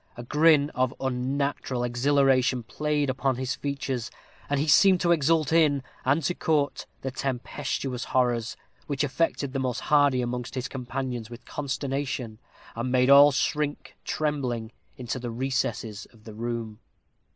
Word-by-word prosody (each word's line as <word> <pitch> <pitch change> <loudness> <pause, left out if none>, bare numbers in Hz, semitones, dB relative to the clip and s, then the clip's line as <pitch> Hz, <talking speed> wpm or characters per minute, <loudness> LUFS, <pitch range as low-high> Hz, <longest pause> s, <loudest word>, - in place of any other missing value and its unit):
A 120 - -6
grin 150 +2 +4
of 130 0 0
unnatural 130 0 -2
exhilaration 130 0 +2
played 150 +5 -1
upon 130 0 0
his 130 0 -2
features, 135 -4 -3 0.4
and 145 -1 +1
he 150 - 0
seemed 185 +6 +6
to 170 - +2
exult 160 -1 +2
in, 150 -5 +3 0.2
and 140 +5 +2
to 180 - +1
court, 150 -4 0
the 135 - -3
tempestuous 130 0 -3
horrors, 120 -3 0 0.3
which 140 -1 -1
affected 140 -1 -1
the 135 - -1
most 130 -2 -1
hardy 145 -4 +3
amongst 120 +1 -4
his 130 0 -2
companions 125 -3 -4
with 120 0 -11
consternation, 135 -5 -3 0.4
and 120 +2 -2
made 130 +1 +4
all 140 +1 +9
shrink, 145 +1 -2
trembling, 125 -7 -2 0.3
into 125 +1 -4
the 120 -1 -5
recesses 115 -4 -2
of 115 -2 -21
the 110 - -10
room. 115 -1 -4
130 Hz, 145 wpm, -26 LUFS, 125-145 Hz, 0.4 s, all